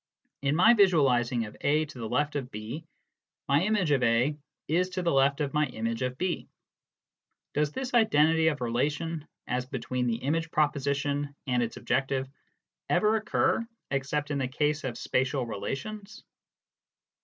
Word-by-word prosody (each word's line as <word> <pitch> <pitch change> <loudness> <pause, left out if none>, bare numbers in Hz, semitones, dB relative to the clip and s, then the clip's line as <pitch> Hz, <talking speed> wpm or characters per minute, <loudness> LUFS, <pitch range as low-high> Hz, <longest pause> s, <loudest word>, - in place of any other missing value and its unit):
In 140 +1 +1
my 220 +8 +7
visualising 130 - +3
of 105 - -10
A 150 +2 +2
to 140 -4 -11
the 115 -2 -4
left 145 0 0
of 135 -3 -3
B, 115 +8 -6 0.6
my 140 +2 +3
image 190 -5 +1
of 135 -3 +3
A 125 +5 +2 0.3
is 180 +4 +1
to 185 0 -3
the 170 - +2
left 140 +1 +3
of 145 0 -1
my 150 0 +2
image 115 -1 -3
of 125 0 -2
B. 180 +1 -2 1.1
Does 150 0 +1
this 260 +4 -4
identity 160 -8 +4
of 150 -4 0
relation, 150 +6 -1 0.2
as 125 0 -2
between 125 -1 -2
the 115 - +1
image 160 +6 -1
proposition 145 -1 0
and 125 -3 +1
its 115 -1 -3
objective, 135 +1 0 0.6
ever 215 +1 +3
occur 225 +3 +1 0.3
except 140 +2 -1
in 140 - 0
the 130 - 0
case 150 +3 0
of 125 -3 -3
spatial 130 0 0
relations 200 - -6
145 Hz, 155 wpm, -28 LUFS, 130-160 Hz, 1.1 s, my